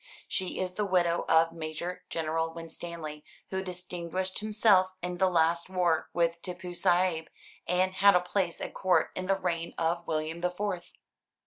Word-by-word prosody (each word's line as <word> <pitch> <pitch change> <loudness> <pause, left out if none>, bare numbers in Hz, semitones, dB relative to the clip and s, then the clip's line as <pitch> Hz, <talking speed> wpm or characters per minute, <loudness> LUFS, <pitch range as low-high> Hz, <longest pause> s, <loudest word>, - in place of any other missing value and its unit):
She 190 -1 -2
is 185 -1 -2
the 210 - -1
widow 175 -3 +2
of 165 0 +5
Major 165 +2 -5
General 165 0 -1
Winstanley, 165 -2 -7 0.3
who 190 0 -1
distinguished 180 0 -4
himself 210 -3 +4
in 180 0 -3
the 190 - +4
last 170 0 +2
war 175 -4 +1
with 170 0 +1
Tippoo 180 0 -6
Saïb, 175 -2 +2 0.4
and 185 +1 +2
had 200 +1 +6
a - - +7
place 180 0 -1
at - - -4
Court 185 -1 +2
in 185 0 -4
the 195 - +3
reign 170 -2 -2
of 170 +1 0
William 155 +1 -2
the 180 +1 +1
Fourth." 180 -1 -4
175 Hz, 160 wpm, -29 LUFS, 165-185 Hz, 0.4 s, a